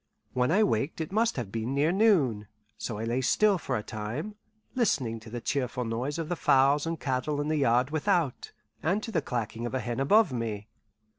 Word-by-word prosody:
When 125 0 +1
I 200 +7 +4
waked 165 -7 0
it 160 +1 -4
must 225 +3 +2
have 115 -7 -4
been 115 +4 -2
near 150 +4 +3
noon, 160 - +3 0.3
so 105 0 -5
I 110 - -4
lay 120 +3 0
still 200 +8 +3
for - - -2
a 105 - -4
time, 115 - -5 0.4
listening 130 - 0
to 110 +1 -12
the 120 +2 -5
cheerful 125 -2 -2
noise 125 +6 -2
of 165 +1 -2
fowls 140 +3 +4
and 165 -1 -3
cattle 135 +2 -1
in 145 +1 -1
the 155 - +1
yard 125 0 +2
without, 160 -3 0 0.3
and 190 +6 0
to 235 - -5
the 165 -6 +1
clacking 115 -2 -3
of 125 - -4
a - - +1
hen 120 0 -3
above 170 +4 +4
me. 110 -3 -4
135 Hz, 205 wpm, -28 LUFS, 115-165 Hz, 0.4 s, I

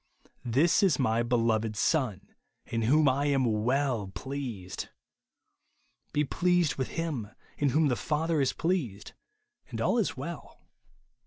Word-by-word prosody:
*' - - -46
This 135 - +3
is 190 -6 +4
my 115 -4 +2
beloved 115 -2 +1
Son, 105 - 0 0.4
in 115 - -2
vdiom 145 +7 +4
I 140 +2 +2
am 135 -2 +2
Avell 115 -1 0
pleased." 120 -10 -5 1.2
Be 150 - +1
pleased 175 +1 +2
with 130 - -2
him, 150 -11 -2 0.3
in 145 - +3
whom 155 +4 +3
the 125 - +1
Father 150 +8 0
is 135 - +2
pleased, 160 - -2 0.6
and - - -5
all - - +2
is - - -1
well. - - -7
130 Hz, 140 wpm, -29 LUFS, 115-150 Hz, 1.2 s, is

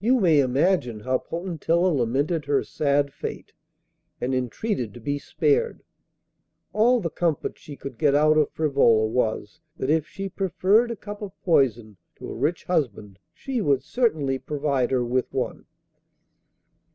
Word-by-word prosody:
You 250 +3 +4
may 165 -7 +4
imagine 130 - +1
how 130 +2 0
Potentilla 170 0 -1
lamented 140 +6 0
her 145 -1 +1
sad 140 -1 0
fate, - - -7 0.7
and 130 +2 -1
entreated 130 - -2
to - - -9
be 145 +5 -2
spared. 450 - 0 0.9
All 240 +4 +4
the 170 -7 -3
comfort 165 -4 -1
she 145 - -10
could 135 -4 -9
get 145 -2 +3
out 155 +1 +4
of 155 -1 +3
Frivola 135 -8 +3
was, 110 -2 -2 0.2
that 130 - -1
if 155 -1 +1
she 195 0 -5
preferred 195 +4 +2
a 235 - -3
cup 205 0 -9
of 200 -3 -8
poison 120 - +1 0.2
to - - -9
a - - -6
rich 150 +7 -1
husband 110 - -2
she 260 -4 -4
would 140 -6 +2
certainly 155 - 0
provide 140 -4 -1
her 125 -2 +1
with 125 +1 -1
one. - - -3
145 Hz, 150 wpm, -24 LUFS, 130-185 Hz, 0.9 s, You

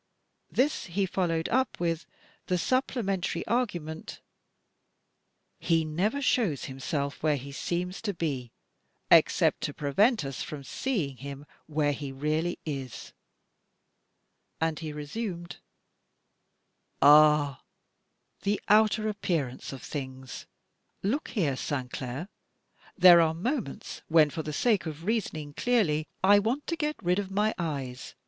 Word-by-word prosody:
This 285 +4 +1
he 190 +3 0
followed 170 -3 0
up 260 +1 +1
with 170 -1 -1 0.4
the 180 - +1
supplementary 195 - 0
argument: 175 -10 -2 1.4
"He 165 -2 +2
never 200 - -1
shows 210 - +1
himself 140 +2 -3
where 155 -1 +3
he 140 +1 -8
seems 180 +5 -3
to 210 - -1
be 135 -8 -3 0.6
except - - +5
to - - -3
prevent 195 - +2
us 135 -1 -5
from 145 -2 -6
seeing 150 - -2
him 140 +1 -8 0.2
where 150 -1 +1
he 140 -1 -5
really 155 +5 -1
is." 135 -5 -6 1.5
And 160 -1 0
he 160 -2 -5
resumed: 170 +4 -5 1.4
"Ah! 150 -1 +6 0.8
the 200 +1 0
outer 215 +1 +4
appearance 165 -11 -2
of 135 -2 -8
things! 130 -2 -6 0.6
Look 245 +10 0
here, 160 - 0
Sainclair! 130 +3 -4 0.7
There 180 -2 +9
are 160 -1 +2
moments 225 - -3
when, 155 -2 +5
for 160 - -3
the 155 - -5
sake 205 +3 +1
of 160 +1 -7
reasoning 165 -9 -2
clearly, 155 -8 +1 0.2
I 205 +2 +7
want 240 +8 -1
to 335 - -1
get 300 -1 -1
rid 180 +2 +2
of 195 -2 -3
my 210 +3 +1
eyes! 135 -7 -4
165 Hz, 125 wpm, -28 LUFS, 145-205 Hz, 1.5 s, There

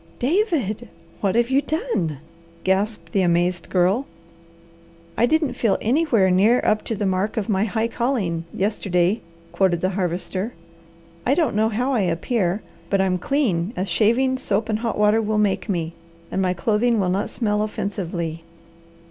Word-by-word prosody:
"David, 260 - 0 0.3
what 200 0 0
have 235 +2 +2
you 275 +1 +4
done?" 300 - -2 0.5
gasped 190 -2 0
the 195 - +2
amazed 175 0 +1
Girl. 190 +9 +2 1.1
"I 240 - +3
didn't 310 -2 +1
feel 220 -5 +1
anywhere 235 - +2
near 210 +7 +4
up 215 0 +2
to 225 - -2
the 205 0 -2
'mark 190 +4 0
of 215 -1 -1
my 200 0 +2
high 225 +1 0
calling' 225 -10 -1
yesterday," 195 -1 0 0.3
quoted 185 -3 +2
the 185 - +1
Harvester. 185 +3 -2 0.7
"I 270 - +2
don't 320 -9 +1
know 220 +1 +3
how 245 +5 0
I 245 - +2
appear, 185 +2 0 0.3
but 195 - +2
I'm 185 -1 +1
clean 215 - 0
as 185 +1 -2
shaving, 240 +8 +2
soap 215 -3 -1
and 215 0 0
hot 230 0 -2
water 210 +1 +4
will 215 0 -1
make 210 +1 +1
me, 170 -3 -1 0.4
and 190 - 0
my 185 -1 +1
clothing 225 +4 +1
will 185 -2 +1
not 195 +2 -1
smell 210 -3 0
offensively. 175 -6 -3
210 Hz, 160 wpm, -22 LUFS, 185-235 Hz, 1.1 s, you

